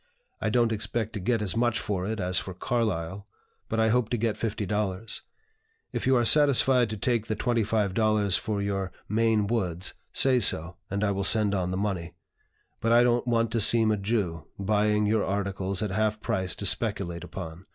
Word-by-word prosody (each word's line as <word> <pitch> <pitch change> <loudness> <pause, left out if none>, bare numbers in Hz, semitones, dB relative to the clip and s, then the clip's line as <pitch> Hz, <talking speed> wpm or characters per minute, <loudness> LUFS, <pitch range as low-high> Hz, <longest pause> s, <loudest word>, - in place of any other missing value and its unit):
I 110 - 0
don't 115 0 +2
expect 110 0 -3
to 105 - -4
get 110 +3 0
as 100 - 0
much 120 -1 +1
for 95 -2 -2
it 110 0 -3
as 90 -1 +2
for 95 - -7
Carlyle, 100 -3 -2 0.4
but 115 - -1
I 110 0 +3
hope 120 -1 +1
to 120 - 0
get 115 -1 0
$50. 105 -1 -3 0.7
If - - -2
you 130 - +4
are 120 -1 +2
satisfied 135 -3 +5
to 110 - -4
take 115 +1 0
the 110 - -1
$25 110 -3 +1
for 105 -2 -2
your 95 -2 -2 0.2
'Maine 110 0 +2
Woods,' 95 -5 -2 0.2
say 130 -2 +4
so, 85 -5 +1
and 100 +2 -2
I 100 - +2
will 100 0 -2
send 105 0 +2
on 90 -2 -1
the 90 - -2
money; 95 -4 -3 0.6
but 115 - 0
I 120 +1 +6
don't 120 0 +1
want 115 -2 +1
to 115 - 0
seem 110 0 +4
a 105 - +1
Jew, 95 -7 -2
buying 105 +1 +1
your 110 0 +2
articles 100 0 -2
at 105 - -2
half 110 +1 0
price 95 -3 -1
to 100 - -6
speculate 100 -5 -1
upon. 85 -1 -8
105 Hz, 190 wpm, -27 LUFS, 95-115 Hz, 0.7 s, I